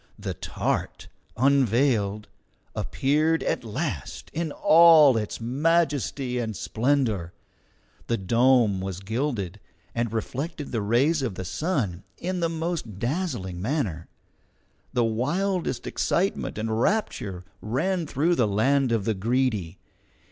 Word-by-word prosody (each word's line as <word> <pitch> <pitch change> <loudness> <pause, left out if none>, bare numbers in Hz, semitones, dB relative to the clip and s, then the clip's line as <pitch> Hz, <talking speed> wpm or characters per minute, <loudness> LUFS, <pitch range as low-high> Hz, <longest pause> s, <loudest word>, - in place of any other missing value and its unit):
The - - -4
TART, - - -3 0.3
unveiled, 120 -5 +2 0.5
appeared 155 +4 +1
at - - -1
last 110 -3 -4
in 165 -1 -2
all 155 -4 +7
its 105 -2 -2
majesty 140 -1 0
and 110 -3 -3
splendour. 115 -9 0 0.7
The 115 - +1
dome 115 0 +3
was 95 -1 -4
gilded, 110 - -2 0.3
and 115 -2 -1
reflected 140 +7 -4
the 115 - -1
rays 130 +9 +2
of 120 -8 -2
the 95 - -5
sun 105 - -2
in 185 +1 -3
the 165 -1 +1
most 160 - -3
dazzling 120 - -3
manner. 105 - -2 0.8
The 120 - +1
wildest 150 - -1
excitement 190 - -1
and 110 +1 -1
rapture 105 - -1 0.2
ran 160 - -1
through 155 +6 +1
the 120 -9 +2
land 130 +6 +2
of 110 -4 0
the 110 - +1
Greedy. 105 -4 -1
125 Hz, 120 wpm, -25 LUFS, 105-150 Hz, 0.8 s, all